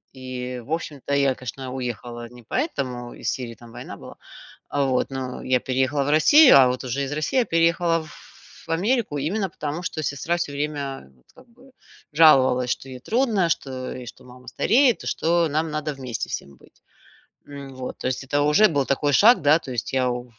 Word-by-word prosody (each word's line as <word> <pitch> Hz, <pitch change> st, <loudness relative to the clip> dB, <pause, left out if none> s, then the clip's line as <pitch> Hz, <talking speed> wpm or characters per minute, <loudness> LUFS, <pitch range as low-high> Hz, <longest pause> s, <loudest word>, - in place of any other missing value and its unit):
и 125 Hz, -1 st, -6 dB
в 130 Hz, -, -13 dB
общем-то 145 Hz, -4 st, -4 dB
я, 140 Hz, -2 st, +2 dB
конечно, 130 Hz, +1 st, -7 dB
уехала 120 Hz, -2 st, -5 dB
не 120 Hz, 0 st, -15 dB
поэтому, 125 Hz, -, -3 dB
из -, -, -2 dB
Сирии, 120 Hz, -4 st, -4 dB
там 120 Hz, 0 st, -15 dB
война -, -, -9 dB
была, -, -, -12 dB, 0.5 s
а, 145 Hz, -, 0 dB
вот. 130 Hz, -1 st, 0 dB
Но 130 Hz, -1 st, -5 dB
я 130 Hz, -1 st, +2 dB
переехала 130 Hz, +3 st, 0 dB
в 140 Hz, -, -2 dB
Россию, 265 Hz, -, +7 dB
а 130 Hz, -2 st, +7 dB
вот 125 Hz, +1 st, -2 dB
уже 130 Hz, +2 st, -3 dB
из 135 Hz, -, -4 dB
России 155 Hz, -, 0 dB
я 245 Hz, -, +2 dB
переехала 165 Hz, 0 st, +2 dB, 0.7 s
в -, -, -5 dB
Америку 200 Hz, -, 0 dB
именно 190 Hz, +7 st, -1 dB
потому, 155 Hz, +2 st, -5 dB
что 155 Hz, -2 st, -4 dB
сестра 145 Hz, +5 st, -1 dB
всё 170 Hz, -4 st, -3 dB
время, 140 Hz, -, -4 dB
вот, 60 Hz, -, -30 dB
как -, -, -17 dB
бы 245 Hz, +3 st, -21 dB, 0.4 s
жаловалась, 130 Hz, -5 st, +5 dB
что 135 Hz, -, -4 dB
ей 130 Hz, -1 st, -8 dB
трудно, 220 Hz, -, +1 dB
что 130 Hz, -5 st, -3 dB
и 125 Hz, -, -8 dB
что 120 Hz, -, -12 dB
мама 125 Hz, 0 st, -16 dB
стареет, 245 Hz, +2 st, +2 dB
что 170 Hz, 0 st, +1 dB
нам 155 Hz, +2 st, -1 dB
надо 150 Hz, 0 st, -3 dB
вместе 130 Hz, -4 st, -5 dB
всем 70 Hz, -, -5 dB
быть. -, -, -23 dB, 0.7 s
М, 140 Hz, -1 st, -9 dB
вот, 130 Hz, -1 st, -6 dB
то -, -, -4 dB
есть 130 Hz, +1 st, -2 dB
это 145 Hz, +2 st, +1 dB
уже 150 Hz, +9 st, +5 dB
был 145 Hz, -6 st, 0 dB
такой 145 Hz, +2 st, 0 dB
шаг, 230 Hz, -, +6 dB
да, 150 Hz, +2 st, +4 dB
то 135 Hz, -, -9 dB
есть 120 Hz, 0 st, -4 dB
я 130 Hz, -1 st, +2 dB
в 120 Hz, 0 st, -4 dB
140 Hz, 195 wpm, -23 LUFS, 130-165 Hz, 0.7 s, Россию